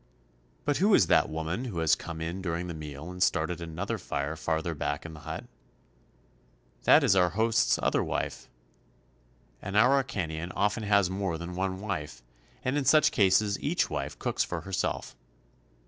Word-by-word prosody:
But 145 Hz, -, +1 dB
who 200 Hz, +2 st, +5 dB
is -, -, +5 dB
that -, -, +3 dB
woman 80 Hz, +9 st, -3 dB
who 110 Hz, -9 st, -5 dB
has 80 Hz, -1 st, +3 dB
come 80 Hz, -1 st, -3 dB
in 85 Hz, +4 st, -4 dB
during 85 Hz, -1 st, -2 dB
the 90 Hz, -, -5 dB
meal 75 Hz, +1 st, -7 dB
and 90 Hz, 0 st, -9 dB
started 85 Hz, -1 st, +1 dB
another 85 Hz, +4 st, -4 dB
fire 70 Hz, +3 st, -3 dB
farther 80 Hz, +1 st, -1 dB
back 75 Hz, 0 st, -3 dB
in 85 Hz, -, -7 dB
the 75 Hz, -, -10 dB
hut? 75 Hz, -, -6 dB, 1.4 s
That -, -, +7 dB
is -, -, +4 dB
our 90 Hz, -2 st, +4 dB
host's 110 Hz, +3 st, +2 dB
other -, -, +2 dB
wife. -, -, -4 dB, 1.1 s
An 100 Hz, +1 st, -5 dB
Araucanian 100 Hz, -, +1 dB
often 105 Hz, +3 st, +1 dB
has 100 Hz, -3 st, +3 dB
more 95 Hz, -3 st, -2 dB
than 85 Hz, +2 st, -6 dB
one 95 Hz, +1 st, -2 dB
wife, 75 Hz, -, -5 dB, 0.4 s
and 130 Hz, +3 st, +1 dB
in 140 Hz, -, -3 dB
such 155 Hz, +3 st, +5 dB
cases 100 Hz, +1 st, +3 dB
each -, -, 0 dB
wife -, -, -4 dB
cooks -, -, 0 dB
for -, -, -4 dB
her 95 Hz, -, -9 dB
self. -, -, -2 dB
90 Hz, 170 wpm, -28 LUFS, 80-105 Hz, 1.4 s, That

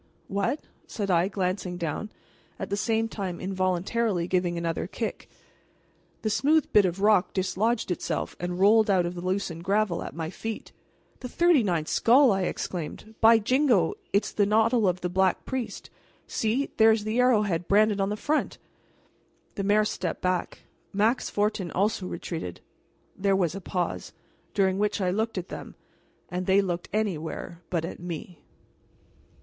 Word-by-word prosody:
"What?" 200 Hz, +9 st, -1 dB, 0.3 s
said 200 Hz, -3 st, -2 dB
I, 175 Hz, +1 st, +3 dB
glancing 185 Hz, -2 st, -2 dB
down, 170 Hz, +5 st, -3 dB, 0.5 s
at -, -, -6 dB
the -, -, +2 dB
same 225 Hz, +2 st, 0 dB
time 190 Hz, -6 st, -5 dB
involuntarily 185 Hz, +1 st, 0 dB
giving 180 Hz, -2 st, 0 dB
another 170 Hz, -1 st, -2 dB
kick. -, -, -5 dB, 0.9 s
The 215 Hz, -, +1 dB
smooth 300 Hz, +7 st, +3 dB
bit 205 Hz, -2 st, +6 dB
of 180 Hz, +1 st, -2 dB
rock 210 Hz, -2 st, +3 dB
dislodged 200 Hz, +3 st, 0 dB
itself 180 Hz, -, -3 dB
and 175 Hz, +1 st, -3 dB
rolled 215 Hz, +2 st, +5 dB
out 185 Hz, -3 st, +3 dB
of 175 Hz, -, -3 dB
the 175 Hz, -, -6 dB
loosened 185 Hz, -2 st, -2 dB
gravel 200 Hz, -2 st, +1 dB
at -, -, -7 dB
my 165 Hz, 0 st, -4 dB
feet. 225 Hz, +2 st, -6 dB, 0.5 s
"The 250 Hz, -, -6 dB
thirty 340 Hz, -1 st, +4 dB
ninth 170 Hz, -7 st, 0 dB
skull!" 255 Hz, +2 st, +5 dB
I 195 Hz, -1 st, +1 dB
exclaimed. 180 Hz, +7 st, -5 dB
"By 225 Hz, 0 st, +8 dB
jingo, 235 Hz, -, +2 dB, 0.2 s
it's 200 Hz, -, +1 dB
the 205 Hz, -1 st, +2 dB
noddle 220 Hz, +1 st, +3 dB
of 180 Hz, 0 st, 0 dB
the 180 Hz, -, -1 dB
Black 190 Hz, 0 st, +1 dB
Priest! 260 Hz, -3 st, -5 dB, 0.3 s
See! 235 Hz, +6 st, -1 dB
there 220 Hz, 0 st, +7 dB
is 220 Hz, -1 st, +1 dB
the 215 Hz, +3 st, -1 dB
arrowhead 210 Hz, -9 st, +2 dB
branded 210 Hz, 0 st, +3 dB
on 195 Hz, -, +1 dB
the 210 Hz, -, -2 dB
front!" 300 Hz, +7 st, -1 dB, 1.0 s
The 200 Hz, -, -3 dB
mayor 210 Hz, +2 st, +3 dB
stepped 185 Hz, -5 st, -3 dB
back. 180 Hz, -1 st, -1 dB, 0.3 s
Max 215 Hz, +5 st, +1 dB
Fortin 205 Hz, -3 st, -1 dB
also 195 Hz, 0 st, 0 dB
retreated. 160 Hz, -, -5 dB, 0.6 s
There 195 Hz, 0 st, +1 dB
was 175 Hz, -4 st, +1 dB
a 195 Hz, -, -6 dB
pause, 180 Hz, -1 st, -3 dB, 0.4 s
during 190 Hz, -1 st, +2 dB
which 210 Hz, 0 st, 0 dB
I 185 Hz, -2 st, +1 dB
looked 220 Hz, +2 st, -1 dB
at 185 Hz, 0 st, -4 dB
them, -, -, -8 dB, 0.5 s
and 180 Hz, +1 st, -3 dB
they 190 Hz, +1 st, +5 dB
looked 175 Hz, -3 st, -2 dB
anywhere 175 Hz, -4 st, -3 dB
but 165 Hz, -2 st, -1 dB
at -, -, -7 dB
me. 175 Hz, 0 st, -7 dB
195 Hz, 160 wpm, -27 LUFS, 180-220 Hz, 1.0 s, By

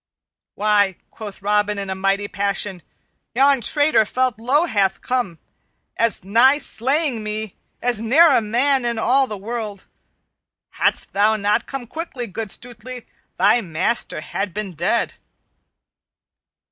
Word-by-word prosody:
"Why," 205 Hz, -2 st, +2 dB, 0.2 s
quoth 205 Hz, -3 st, -9 dB
Robin 210 Hz, 0 st, +1 dB
in 195 Hz, -1 st, -4 dB
a -, -, 0 dB
mighty 195 Hz, +1 st, 0 dB
passion, 200 Hz, -2 st, -2 dB, 0.5 s
"yon 275 Hz, 0 st, +4 dB
traitor 290 Hz, 0 st, +3 dB
felt 250 Hz, +1 st, -1 dB
low 275 Hz, +8 st, +2 dB
hath 200 Hz, -, +1 dB
come 245 Hz, -10 st, -2 dB, 0.6 s
as 230 Hz, -6 st, +1 dB
nigh 235 Hz, +8 st, +5 dB
slaying 270 Hz, -1 st, 0 dB
me 215 Hz, -1 st, -5 dB, 0.3 s
as 240 Hz, -3 st, +2 dB
e'er 285 Hz, +6 st, +5 dB
a -, -, +4 dB
man 250 Hz, +5 st, +1 dB
in 235 Hz, -1 st, -1 dB
all 260 Hz, +4 st, +3 dB
the 210 Hz, -, -5 dB
world. 210 Hz, -1 st, -5 dB, 0.9 s
Hadst -, -, 0 dB
thou 210 Hz, +2 st, +3 dB
not 210 Hz, +2 st, 0 dB
come 270 Hz, -3 st, -5 dB
quickly, 275 Hz, -2 st, -5 dB
good 220 Hz, +1 st, -5 dB
Stutely, 245 Hz, +2 st, -6 dB, 0.3 s
thy 205 Hz, +6 st, +4 dB
master 170 Hz, +1 st, -1 dB
had 195 Hz, +3 st, -4 dB
been 210 Hz, -3 st, -4 dB
dead." 175 Hz, +8 st, 0 dB
220 Hz, 135 wpm, -21 LUFS, 200-250 Hz, 0.9 s, nigh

